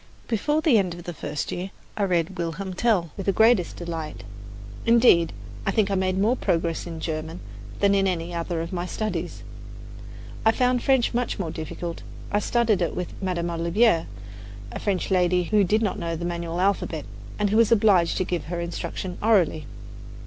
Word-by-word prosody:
Before 295 +7 +1
the 285 -9 +5
end 180 -3 -1
of 175 - -10
the 175 - -5
first 150 -1 -4
year 180 +2 -4 0.3
I 205 - +1
read 180 0 0
"Wilhelm 180 +3 -3
Tell" 185 -5 +1
with 195 - -6
the - - +5
greatest 220 -2 +3
delight. 165 - -5 0.6
Indeed, 230 -8 +5 0.3
I - - -1
think 205 0 +2
I - - +1
made 185 -1 +1
more 215 +6 +3
progress 165 -6 -1
in 165 -1 -6
German 160 +1 -4 0.4
than 200 0 +4
in 195 -1 +3
any 175 -1 -2
of 165 0 -3
my 175 - -1
other 180 - -4
studies. 215 +3 -3 1.0
I 225 - +5
found 250 0 +2
French 265 -3 +2
much 245 0 -1
more 175 -6 -3
difficult. 165 +2 -5 0.3
I 205 - +2
studied 220 -3 +1
it 170 - 0
with 180 -1 -4
Madame 175 -2 -1
Olivier, 170 +2 +2 0.6
a - - -5
French 195 -2 -1
lady 180 -1 +3
who 210 +3 +3
did 215 +4 +2
not 210 - -1
know 165 0 -2
the 170 +1 -4
manual 170 0 -3
alphabet, 185 -5 0 0.3
and 205 -1 +1
who 215 - +3
was 230 -1 +4
obliged 200 -6 +4
to 185 - +1
give 175 -1 -3
her 170 +1 -4
instruction 175 +1 -4
orally. 180 - +2
180 Hz, 185 wpm, -25 LUFS, 170-210 Hz, 1.0 s, the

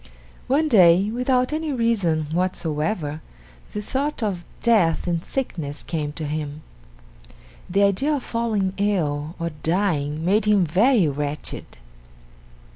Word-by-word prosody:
One 300 +4 +2
day, 190 - +5
without 250 +3 +1
any 315 0 -2
reason 205 - +1
whatsoever, 160 -3 -1 0.5
the 210 - -4
thought 275 +2 -2
of 185 -5 -2 0.2
death 205 -9 +3
and 170 -1 -1
sickness 160 - -4
came 150 -3 -3
to 155 0 -5
him. 150 0 -4 1.1
The 195 +3 +3
idea 235 +10 +2
of 275 - -4
falling 220 -5 -1
ill 160 -6 -1
or 170 0 -2
dying 160 -4 0
made 205 +5 +2
him 205 -3 +4
very 200 - +3
wretched. 145 - -4
185 Hz, 120 wpm, -23 LUFS, 155-230 Hz, 1.1 s, day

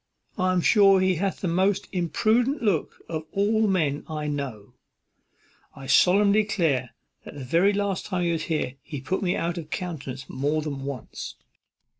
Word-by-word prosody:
I 185 -1 +1
am 180 -1 +2
sure 195 -1 +5
he 185 -2 +2
hath 195 +2 -2
the 185 - -1
most 190 +3 +1
impudent 220 - +1
look 195 -8 -1
of 160 -2 -4
all 210 +3 +1
the 220 - +3
men 155 -7 0
I 155 -1 -4
know; 140 -8 -5 1.0
and 135 - -11
I - - -7
solemnly 200 +9 +5
declare, 160 - -1 0.3
the 140 - -9
very 170 +10 +3
last 200 -2 -2
time 185 -3 -1
he 170 - +1
was 160 -1 -2
here 150 -5 -2
he 145 -3 -7
put 185 +8 -2
me 180 -2 0
out 170 +1 -2
of 155 -2 -9
countenance 140 -8 -5
more 145 +4 -1
than 140 -3 -5
once." 140 -4 -6
175 Hz, 175 wpm, -25 LUFS, 145-195 Hz, 1.0 s, sure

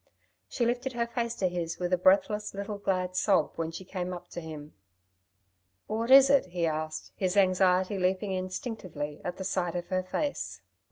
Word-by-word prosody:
She 240 - 0
lifted 245 +2 -1
her 235 -1 0
face 235 0 -2
to 190 - +1
his 170 -2 -3
with 180 0 -2
a - - +7
breathless 200 +3 +3
little 200 +1 -4
glad 185 -2 -1
sob 190 -6 +3
when 165 -1 -2
she 175 +3 -8
came 180 -1 -4
up 175 - -9
to 175 - -6
him. 155 -2 -9 1.1
"What 225 +2 -2
is 270 0 +9
it?" 275 -7 +4
he 175 -1 -1
asked, 155 0 -3
his 185 0 -1
anxiety 185 0 +3
leaping 185 +2 0
instinctively 185 - -4
at 180 +1 -4
the 190 - -5
sight 180 -2 -1
of 175 0 -4
her 185 0 +1
face. 285 +10 -3
185 Hz, 180 wpm, -29 LUFS, 175-210 Hz, 1.1 s, is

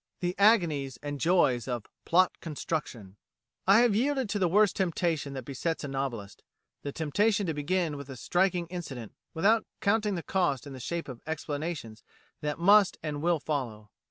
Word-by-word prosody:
The 175 0 -1
Agonies 160 - +3
and 145 -1 -4
Joys 150 -9 +3
of 120 -4 -3 0.2
"Plot 185 +2 +3
Construction" 140 - -5 0.5
"I 200 +4 +7
have 240 -4 +3
yielded 265 0 +1
to 205 - -1
the 185 - +3
worst 200 +2 +4
temptation 165 -6 -1
that 130 -3 -6
besets 155 +5 -3
a - - -3
novelist 130 -7 -4 0.4
the 140 - -4
temptation 200 +8 +1
to 165 - -1
begin 160 +2 -1
with 140 -1 -9
a 135 - -7
striking 180 - +1
incident 140 - -7 0.2
without 215 +7 +3
counting 210 -1 +1
the 170 - -4
cost 160 -9 0
in 140 - -8
the 130 - -8
shape 170 +8 -4
of 125 -4 -8
explanations 150 -7 -4 0.4
that 150 -1 -2
must 200 +3 +5
and 150 -2 -3
will 170 0 +2
follow. 120 -9 -4
160 Hz, 170 wpm, -29 LUFS, 135-185 Hz, 0.5 s, I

